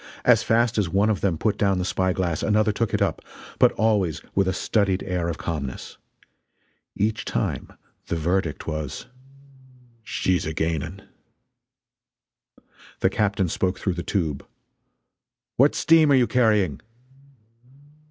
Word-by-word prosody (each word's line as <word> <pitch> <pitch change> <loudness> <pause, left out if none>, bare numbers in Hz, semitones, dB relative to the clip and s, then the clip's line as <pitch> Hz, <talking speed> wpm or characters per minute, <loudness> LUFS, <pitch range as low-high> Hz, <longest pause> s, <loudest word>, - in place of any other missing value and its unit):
As - - +6
fast 115 0 +2
as 95 -5 0
one 100 +5 +2
of 105 - -2
them 90 -5 0
put 105 +5 -1
down 100 -2 +2
the 90 - -1
spy 95 0 0
glass 90 -4 -1
another 110 +1 +2
took 115 +1 -1
it - - +1
up - - -2 0.4
but - - +6
always 100 -7 +1
with 95 -1 +2
a - - +2
studied 95 0 0
air 90 -3 -2
of 80 - -4
calmness. 70 -6 -5 1.0
Each 110 +2 -1
time - - -3 0.4
the - - -2
verdict 85 0 -1
was: 75 -3 -4 1.0
"She's 95 -6 -1
a 80 - -4
gaining!" 80 +4 -2 2.0
The - - +3
captain 100 -3 0
spoke 90 +2 -1
through 95 - -1
the 85 - -4
tube: 80 -8 -2 1.1
"What 140 +4 +4
steam 160 -2 +4
are - - +6
you 125 -2 +4
carrying?" 105 - +2
95 Hz, 140 wpm, -24 LUFS, 85-110 Hz, 2.0 s, As